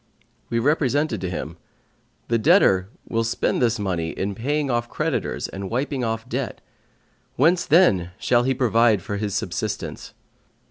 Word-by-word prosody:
We 115 - -1
represented 140 - +1
to 90 - -2
him: 90 - -5 0.7
The 115 0 +1
debtor 110 - +4 0.2
will 115 0 0
spend 115 +3 0
this 120 -1 +2
money 90 -5 -2
in 100 +4 -3
paying 140 +6 -1
off 120 0 -1
creditors - - -2
and 95 0 -6
wiping 130 +2 -2
off 115 -1 -3
debt; - - -3 0.8
whence 170 +6 +3
then 125 - +4
shall 120 +3 +2
he 130 +2 0
provide 115 -5 +3
for 100 +1 -4
his 100 -1 -3
subsistence? - - -4
115 Hz, 145 wpm, -23 LUFS, 100-135 Hz, 0.8 s, debtor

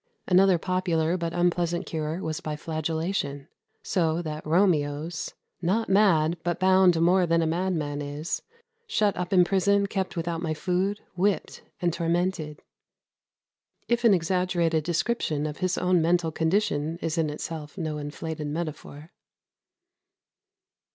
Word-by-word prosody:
Another 185 0 +5
popular 175 -2 0
but 170 -2 -2
unpleasant 175 0 0
cure 160 +2 -3
was 160 +1 -3
by 155 -1 -4
flagellation; 160 -2 -3 0.4
so 165 -3 +1
that 155 -1 -5
Romeo's 160 -2 +1 0.3
"Not 200 +6 0
mad, 175 -5 +4
but 175 -1 -1
bound 185 -2 +5
more 180 +2 +4
than 165 0 +3
a - - +1
madman 160 -4 -1
is, 145 +3 -4 0.5
Shut 210 - +1
up 180 0 -4
in 185 -2 +6
prison, 200 +2 +2
kept 195 -3 -3
without 165 0 -2
my 160 -2 -2
food, 190 +4 -1
Whipped 195 +2 0 0.2
and 175 -3 0
tormented," 170 -2 -1 1.2
if 240 0 +1
an 225 -4 +6
exaggerated 170 -2 +1
description 165 -3 -1
of 150 -1 -4
his 185 -1 -1
own 180 -1 +2
mental 170 0 +2
condition 160 -2 0
is 165 +1 -1
in 155 -2 +1
itself 150 +1 -6
no 155 -4 -3
inflated 150 +1 -5
metaphor. 155 0 -6
170 Hz, 130 wpm, -26 LUFS, 155-185 Hz, 1.2 s, in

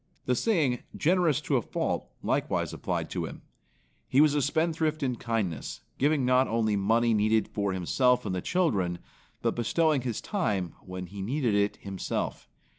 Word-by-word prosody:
The 125 - +2
saying, 145 - +1 0.2
"Generous 165 -3 +3
to 145 -2 +1
a - - +1
fault" - - -2 0.2
likewise - - 0
applied - - -2
to - - -2
him. - - -10 0.6
He 135 - +3
was 150 -1 +6
a 145 - +2
spendthrift 155 +1 0
in 125 -2 0
kindness, 105 - -3 0.2
giving 145 -1 +2
not 130 +1 +4
only 110 -1 +1
money 115 +4 +2
needed 110 +1 +2
for 100 -2 -1
himself 125 +8 +2
and - - -2
the 90 - -2
children, 100 - +1 0.5
but - - +2
bestowing 150 +4 +2
his 120 -3 -3
time 105 - -1
when 90 0 -6
he 100 +3 -8
needed 120 +2 0
it 100 0 +2
himself. 95 -2 -4
120 Hz, 165 wpm, -28 LUFS, 100-150 Hz, 0.6 s, was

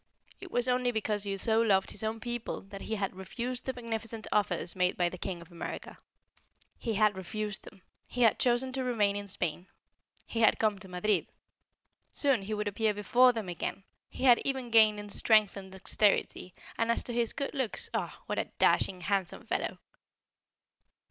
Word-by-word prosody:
It 380 - -9
was 245 -6 0
only 250 0 +2
because 215 -2 -1
he 195 -1 -2
so 220 +3 +2
loved 195 -4 +3
his 210 - -3
own 220 +1 -2
people 240 0 -4
that 195 0 -10
he 220 - -3
had 195 -3 -2
refused 240 +6 -4
the 260 - 0
magnificent 225 -2 -4
offers 180 -4 0
made 180 -1 +1
by 175 -1 +2
the 180 - -8
King 180 -2 -4
of 170 +1 -14
America. 170 -1 -7 0.8
He 225 -2 -2
had 210 0 +3
refused 205 +2 -3
them; 185 - -14 0.2
he 245 - 0
had 225 - +4
chosen 255 +1 +2
to 265 0 -1
remain 215 -5 +1
in 205 0 -4
Spain. 175 -1 -3 0.6
He 230 - -4
had 225 - +5
come 215 -3 +1
to 195 - -11
Madrid. 185 +4 0 0.8
Soon 275 -7 +2
he 205 +3 -4
would 210 0 -2
appear 210 +1 +1
before 245 +5 +5
them 225 -5 -4
again. 180 +2 -4 0.3
He - - -7
had 245 -3 +7
even 265 -3 -2
gained 215 -2 +6
in 205 - -7
strength 215 0 +3
and 190 -1 -8
dexterity; 190 -1 0 0.2
and 230 0 +1
as - - 0
to 240 - -4
his 235 -1 +1
good 280 - -3
looks 260 -6 -2
ah! - - -3
what - - -2
a - - 0
dashing, 185 -2 +3
handsome 190 -1 -1
fellow! - - -2
215 Hz, 190 wpm, -30 LUFS, 195-235 Hz, 0.8 s, had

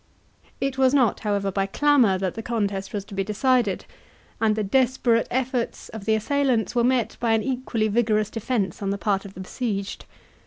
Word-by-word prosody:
It 270 -1 -2
was 260 +1 +4
not, 245 -7 +3
however, 200 -2 -1
by 195 0 0
clamour 250 -4 +3
that 185 -1 -2
the 225 - -5
contest 205 -4 -2
was 200 -2 -4
to 205 - -12
be 195 0 -1
decided, 215 0 +1 0.6
and 220 -1 +3
the 215 - -1
desperate 240 +1 +2
efforts 250 -1 -2
of 220 -3 -8
the 220 - +3
assailants 240 -2 +1
were 240 -1 +2
met 250 -2 +1
by 230 -2 +2
an 220 - +2
equally 250 -4 -1
vigorous 215 -1 +1
defence 225 -4 -2
on 195 - -1
the 200 - -1
part 200 -1 0
of 195 - -11
the 185 - -7
besieged. 200 -1 -4
220 Hz, 190 wpm, -24 LUFS, 200-250 Hz, 0.6 s, was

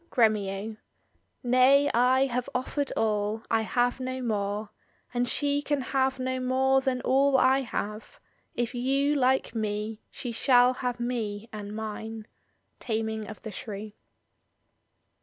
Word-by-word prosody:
Gremio* 215 -2 +1 0.3
— - - -40 0.3
Nay, 255 +3 +5
I 255 +3 +4
have 250 -1 -2
offered 275 +2 -1
all, 215 0 0
I 225 - +3
have 245 +3 0
no 255 0 -3
more; 205 -2 -2 0.4
And 245 0 +1
she 285 0 +1
can 290 0 -1
have 265 0 0
no 260 0 -2
more 265 +1 +2
than 255 -1 -1
all 270 +1 +3
I 260 +1 +4
have: 220 - -5 0.4
If 240 0 -1
you 275 +4 +1
like 265 -3 +2
me, 215 0 -3
she 245 - -6
shall 245 +1 +4
have 250 -1 -3
me 230 -3 -3
and 210 0 -6
mine. 220 0 -6 0.5
Taming 220 -2 -2
of 215 - -10
the 220 - -6
Shrew. 210 +1 -7
245 Hz, 140 wpm, -27 LUFS, 220-260 Hz, 0.5 s, Nay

